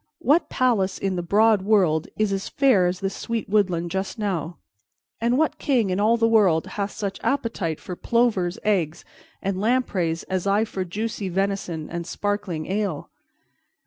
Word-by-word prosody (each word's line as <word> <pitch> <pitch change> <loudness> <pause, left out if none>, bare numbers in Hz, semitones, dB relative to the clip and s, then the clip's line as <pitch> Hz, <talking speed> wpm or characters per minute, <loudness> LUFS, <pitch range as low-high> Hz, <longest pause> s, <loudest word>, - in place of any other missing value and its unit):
What 295 +7 +2
palace 225 -7 +1
in 195 -1 -1
the 175 - -1
broad 210 +4 +3
world 185 -6 +2
is 210 -2 +1
as 195 0 -3
fair 255 -10 +3
as 180 0 -3
this 195 0 -2
sweet 230 -2 -3
woodland 180 -5 +1
just 190 +4 -3
now, 175 -6 -2 0.6
and 235 +2 +1
what 315 +1 +1
king 240 -9 +1
in 185 - 0
all 220 +3 +3
the 230 0 +3
world 195 -8 +4
hath 200 +1 -3
such 200 -3 -5
appetite 225 - -1
for 180 - -7
plover's 215 -5 +1
eggs 175 -7 0 0.4
and 195 -1 -1
lampreys 200 -8 0
as 185 0 -2
I 205 +3 +3
for 190 -3 -4
juicy 205 +2 -4
venison 185 -4 -2
and 170 0 -5
sparkling 200 -7 -2
ale? 195 -5 -2
195 Hz, 165 wpm, -24 LUFS, 180-220 Hz, 0.6 s, world